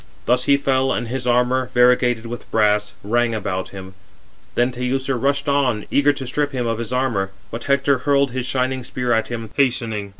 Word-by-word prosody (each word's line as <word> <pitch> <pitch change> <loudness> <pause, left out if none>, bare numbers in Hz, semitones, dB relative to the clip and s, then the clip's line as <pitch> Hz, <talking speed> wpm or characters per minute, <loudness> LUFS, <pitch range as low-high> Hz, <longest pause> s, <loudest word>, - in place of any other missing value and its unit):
Thus 125 +1 +2
he 140 - +5
fell, 135 -1 +1
and 120 - -2
his 125 0 -3
armour, 125 +1 +2
variegated 125 -1 +3
with 120 +1 -7
brass, 105 -1 +2
rang 120 +2 +1
about 95 -3 -3
him. 95 -1 -10 0.6
Then 120 +1 +2
Teucer 130 +2 -1
rushed 140 +4 0
on, 135 -7 +1
eager 145 +1 +4
to 135 -2 -6
strip 145 +3 -1
him 125 -2 -1
of 115 -1 -1
his 115 0 -4
armour; 120 -7 0 0.2
but 115 - -6
Hector 140 -1 +2
hurled 140 0 +2
his 130 0 -3
shining 130 0 -1
spear 125 0 -1
at 110 0 +1
him, 115 -2 -6
hastening. 115 -7 0
125 Hz, 190 wpm, -21 LUFS, 115-135 Hz, 0.6 s, he